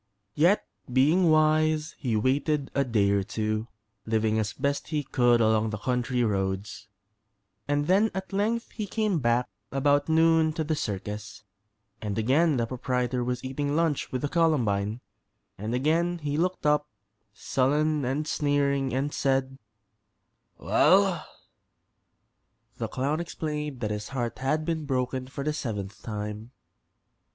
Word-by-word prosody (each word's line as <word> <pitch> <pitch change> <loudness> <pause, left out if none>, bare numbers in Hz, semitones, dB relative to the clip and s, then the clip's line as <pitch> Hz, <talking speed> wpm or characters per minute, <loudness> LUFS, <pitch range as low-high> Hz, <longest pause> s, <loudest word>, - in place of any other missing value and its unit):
Yet, 175 - +3 0.3
being 155 +8 +4
wise, 155 0 +3
he 120 -6 -1
waited 140 +5 0
a 140 - +2
day 105 -6 +2
or 100 0 +2
two, 110 +2 -2 0.4
living 110 0 +1
as 105 -1 -1
best 140 +4 -2
he 150 -2 -1
could 120 -3 +3
along 110 -1 +3
the 105 - -3
country 125 +2 0
roads, 100 -1 -2 0.8
and 145 0 +1
then 195 +6 +4
at 190 0 -5
length 220 +4 0
he 215 -2 -5
came 210 -4 0
back 120 -1 +1 0.2
about 145 +2 +2
noon 160 0 +4
to 160 - -2
the 155 +1 -1
circus, 105 -3 -5 0.6
and 105 -2 -3
again 140 +7 +3
the 115 - +1
proprietor 125 0 -1
was 125 0 -3
eating 145 +2 -2
lunch 160 -3 0
with 130 +1 -3
the - - +1
Columbine, 120 - +1 0.5
and 110 +4 -3
again 165 +6 +1
he 145 -3 -3
looked 180 +3 -1
up, 150 0 +3 0.4
sullen 150 +3 +1
and 140 +5 -1
sneering, 140 -3 +1
and 140 +2 -1
said: 135 0 0 1.0
"Well?" - - +3 1.5
The - - -2
clown 140 +5 -1
explained 150 -5 -4
that 105 -2 -1
his 105 0 -4
heart 120 -4 -3
had 150 +4 0
been 160 -2 -2
broken 130 -1 -1
for 140 +1 -6
the 150 +1 0
seventh 105 -8 -5
time. 105 +2 -6
135 Hz, 140 wpm, -27 LUFS, 115-155 Hz, 1.5 s, being